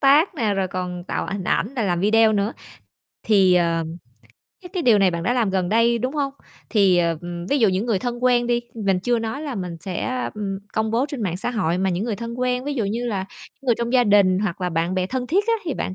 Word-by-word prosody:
tác 295 +7 +4
nè, 215 -8 0
rồi 190 -1 -1
còn 180 -1 -4
tạo - - -3
hình 195 -2 -4
ảnh 230 +9 0
rồi 230 -5 -1
làm 175 -3 0
video 220 +2 +4
nữa. 205 +2 0 0.8
Thì, 195 -4 +5
ờ, 170 -1 +2 0.8
cái 360 - -9
cái 360 -4 -2
điều 225 -6 +5
này 190 -2 +4
bạn 170 -1 -3
đã 190 - +1
làm 235 -5 +1
gần 185 -2 0
đây, 230 +2 +3
đúng 255 +5 -2
hông? 280 -2 -1 0.4
Thì, 195 -5 +4
ờ, 165 -2 +1 0.3
ví 285 - +2
dụ 220 -4 +4
những 190 +4 -1
người 220 -5 +1
thân 245 +1 -4
quen 240 -1 +3
đi, 240 0 +1
mình 195 -4 0
chưa 240 +3 +1
nói 225 +5 -4
là 285 -5 -4
mình 180 -4 -5
sẽ, 250 +8 -3
ừm, 195 -2 -3
công 220 0 0
bố 235 +4 +1
trên 275 -5 -5
mạng 180 -4 -1
xã 200 - -3
hội, 185 -7 0
mà 190 0 +1
những 180 +5 -1
người 220 -4 -2
thân 235 0 -6
quen, 250 0 0
ví 290 0 -2
dụ 230 -6 -1
như 230 +5 -2
là 195 -4 -2 0.4
những 270 - -17
người 240 - +4
trong 235 +1 -2
gia 250 -2 +5
đình 200 -3 +4
hoặc 195 -3 -2
là 180 - 0
bạn 165 +3 -1
bè 185 0 0
thân 250 +3 -3
thiết 390 +8 +2
á, 460 - +2
thì 310 -7 -2
bạn 185 - -3
215 Hz, 260 wpm, -22 LUFS, 185-245 Hz, 0.8 s, Thì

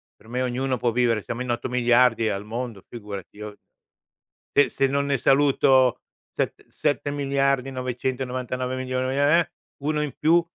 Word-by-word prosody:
per 110 - -21
me 125 +2 -2
ognuno 130 +1 -1
può 120 0 0
vivere, 115 -2 +2
siamo 115 +8 -5
in 125 - -3
8 120 - -2
miliardi 120 -2 +3
al 100 0 -3
mondo, 115 -2 -5
figurati. 105 -4 -8
Io 105 -1 -8 1.0
se 140 -3 +5
se 135 +3 +1
non 140 +1 0
ne 140 -1 +1
saluto 135 -2 +4 0.3
set - - -3
7 145 0 -1
miliardi, 140 -2 0
999 130 0 -3
milioni, 130 0 -2
ehm, 145 +1 +3
eh! 170 - -2 0.3
Uno 150 +1 0
in 150 -3 -3
più 170 +2 +4
125 Hz, 160 wpm, -24 LUFS, 120-135 Hz, 1.0 s, se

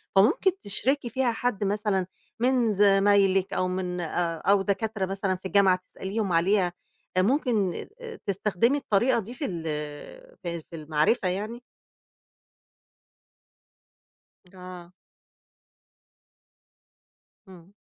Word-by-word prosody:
فممكن 325 - +4
تشركي 240 +6 0
فيها 250 0 +1
حد 225 -3 -2
مثلًا 200 -2 0 0.3
من 245 -2 +2
زمايلِك، 195 -1 +4
أو 185 - +1
من 180 -1 -3
آآ، 165 0 -1
أو 200 +3 +3
دكاترة 210 0 -1
مثلًا 195 0 -1
في 185 - -14
الجامعة، 190 -1 +4
تسأليهم 195 -1 -3
عليها. 180 +1 +2 0.4
ممكن 215 - +1 0.4
تستخدمي 205 +6 +1
الطريقة 240 -1 +2
دي 225 +3 -7
في 270 +4 -4
ال 170 -8 -4 0.8
في 170 -1 -4
في 170 - -9
المعرفة 155 +6 +1
يعني؟ 215 +6 -3 2.9
آه. 180 -1 -10 2.6
إمم. 185 -1 -15
195 Hz, 95 wpm, -26 LUFS, 185-225 Hz, 2.9 s, فممكن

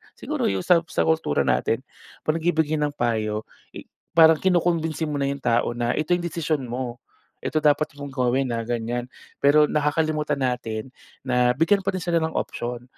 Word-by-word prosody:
siguro - - -3
yung 95 -1 -1
sa 175 -2 +5
sa - - 0
kultura 160 - +1
natin, 115 - +1 0.4
'pag 155 - +1
nagbibigay 160 -2 +1
ng 150 -1 0
payo, 110 -4 -1 0.3
eh, - - -8 0.3
parang 160 -1 +7
kinukumbinsi 170 -3 +1
mo 145 -1 -2
na 140 - 0
yung 140 0 -7
tao 120 0 +1
na, 120 0 0
"Ito 155 +3 -2
yung 175 - -4
desisyon 160 -3 -1
mo. 120 0 -4 0.4
Eto 155 - -1
dapat 150 +1 +3
mong 145 -1 -7
gawin, 130 0 0
ah." 115 - -2
Ganyan. 120 +1 -2 0.3
Pero, 145 +2 +5
nakakalimutan 150 0 0
natin 125 -1 -3 0.3
na 125 -1 +2
bigyan 165 +8 +3
pa 195 - 0
rin 185 - -3
sila 170 -1 +1
ng 160 - -3
option. 120 0 -3
145 Hz, 175 wpm, -24 LUFS, 120-160 Hz, 0.4 s, parang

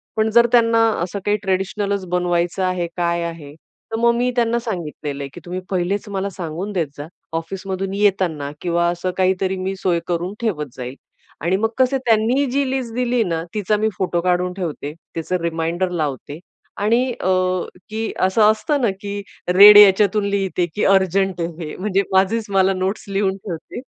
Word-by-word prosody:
पण 220 0 +2
जर 235 +1 +6
त्यांना 230 -1 +4 0.2
असं 185 +3 -4
काही 210 0 +2
ट्रेडिशनलच 195 +1 -1
बनवायचं 175 0 0
आहे, 185 -2 0
काय 170 0 0
आहे. 165 -4 -7
तर 225 +7 -11
मग 235 0 +4
मी 245 +1 +1
त्यांना 235 0 +2
सांगितलेलं 155 - -5
आहे, 140 - -6
की - - -9
तुम्ही 180 +1 -4
पहिलेच 195 +3 -1
मला 195 0 -2
सांगून 180 +1 -5
देत 165 -5 0
जा, 145 +2 -7 0.3
ऑफिसमधून 190 +3 -4
येताना 185 -8 0
किंवा 170 -1 +1
असं 175 +1 -2
काहीतरी, 190 0 +1
मी 190 +1 -3
सोय 180 -3 0
करून 175 +2 -2
ठेवत 150 - -2
जाईल. 125 +1 -6 0.5
आणि 170 +4 +1
मग 225 +2 +1
कसं 260 +1 +3
त्यांनी 235 +5 +3
जी 275 0 0
लिस्ट 260 -4 -3
दिली 245 -2 +1
ना, 165 -3 -2
तिचा 210 0 0
मी 215 +1 +1
फोटो 180 -2 0
काढून 180 0 0
ठेवते, 165 -6 -4 0.2
त्याचं 175 +3 -1
रिमाइंडर 170 +2 -1
लावते. 150 -3 -4 0.4
आणि 235 +5 +2
अ, - - -1 0.6
की 220 +1 -3
असं 190 +4 +2
असतं 280 +6 -1
ना, 235 - +3
की 200 0 -4 0.3
रेड 205 +2 +10
याच्यातून 205 0 +6
लिहिते, 195 -3 0
की 210 - -1
अर्जंट 190 -1 +2
आहे 165 - 0 0.2
हे. - - -7
म्हणजे 195 0 +1
माझीच 195 +4 +2
मला 195 0 +3
नोट्स 190 +4 -2
लिहून 195 -1 0
ठेवते. 185 +4 -7
190 Hz, 175 wpm, -20 LUFS, 175-210 Hz, 0.6 s, रेड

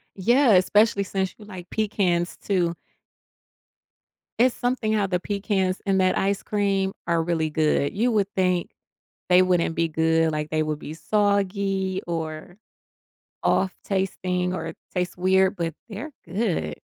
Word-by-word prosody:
Yeah, 240 +5 +4
especially 200 +2 +4
since 190 -1 -2
you 210 - -13
like 185 -4 -10
pecans, 185 -5 0
too. 175 -4 0 1.6
It's 250 +1 +4
something 245 -3 -1
how 205 -2 +1
the 180 -1 0
pecans 195 -1 -1
in 195 - +3
that 185 -1 +3
ice 200 +1 0
cream 195 -2 0
are 170 -1 +2
really 160 -2 0
good. 150 -2 +1
You 235 +4 +2
would 205 -3 +2
think 180 -2 +1 0.6
they 180 0 +6
wouldn't 180 -3 +1
be 165 0 +1
good, 160 0 +2
like, 150 0 -2
they 155 0 0
would 155 -1 -2
be 155 - -8
soggy 195 0 0
or 165 0 -5 0.9
off 190 -1 +1
tasting 185 -2 -1
or - - -4
it - - -8 0.2
tastes 180 -1 -2
weird 190 +1 +3
but 165 -2 -2 0.2
they're 235 +9 -6
good. 170 - -1
185 Hz, 145 wpm, -24 LUFS, 170-200 Hz, 1.6 s, they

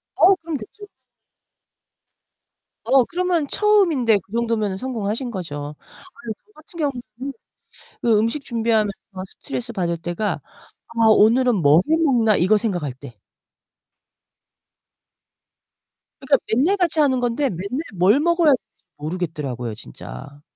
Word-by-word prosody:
어우 385 +2 +6
그럼 325 -3 -4
됐죠. 410 - -11 2.0
어, 265 -2 +4
그러면 350 -4 0
처음인데 335 - +3
그 200 - -29
정도면은 225 -4 -1
성공하신 235 0 -3
거죠. 150 -6 -6 0.3
아유, 280 -11 -8
저 425 - -28
같은 335 +2 -16
경우는 260 -2 -4 0.7
그 225 -3 +4
음식 230 +6 -1
준비하면서 225 -3 +1 0.5
스트레스받을 195 -11 -3
때가 175 +5 -3 0.5
'아, 230 -1 0
오늘은 230 +3 +5
뭘 155 -2 +5
해 320 - +4
먹나.' 230 -8 +3
이거 200 +5 +3
생각할 175 - -2
때. 120 -4 -13 3.0
그러니까 - - +3 0.2
맨날 320 - +3
같이 340 -4 0
하는 265 -4 +3
건데 245 +3 0
맨날 200 - -4
뭘 195 +10 +4
먹어야 340 0 +3
할지 265 - +3 0.3
모르겠더라고요, 150 -8 -4
진짜. 85 - -11
230 Hz, 270 characters per minute, -21 LUFS, 185-285 Hz, 3.0 s, 어우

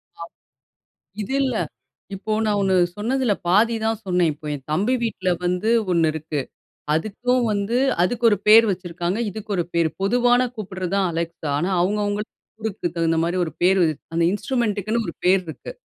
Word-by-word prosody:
ஆ. - - -13 1.0
இது 235 +7 -4
இல்ல. 260 -4 0 0.6
இப்போ, 215 +3 -5
நான் 205 -1 +1
ஒண்ணு 190 -1 +2 0.2
சொன்னதுல 240 +1 +1 0.2
பாதிதான் 225 +2 +2
சொன்னேன். 180 -3 +2
இப்போ 150 +1 -15
என் 135 -1 -11
தம்பி 210 +11 +1
வீட்ல 190 -5 -1 0.2
வந்து 180 +5 0 0.2
ஒண்ணு 165 -2 +3
இருக்கு. 155 -2 -3 0.5
அதுக்கும் 240 +8 0
வந்து 205 +4 0 0.3
அதுக்கு 235 +5 -1
ஒரு 205 - +2
பேர் 225 +2 +8
வச்சிருக்காங்க. 175 +1 -3
இதுக்கு 215 +2 -9
ஒரு 175 - +1
பேர். 165 -1 +2
பொதுவான 245 +4 +3
கூப்பிடுறது 185 -3 -5
தான், 195 -2 +2
Alexa! 165 -1 -4
ஆனா, 175 +5 0
அவங்கவங்களுக்கு 205 +2 -1 0.3
ஊருக்கு 200 -5 -2
தகுந்த 165 -1 +1
மாதிரி 175 +2 -1
ஒரு 160 - -6
பேரு. 185 0 +4 0.3
அந்த 165 0 +1
இன்ஸ்ட்ரூமென்ட்டுக்குன்னு 220 -1 -1
ஒரு 170 - -4
பேர் 185 +1 +5
இருக்கு. 160 - -8
200 Hz, 155 wpm, -22 LUFS, 175-220 Hz, 1.0 s, பேர்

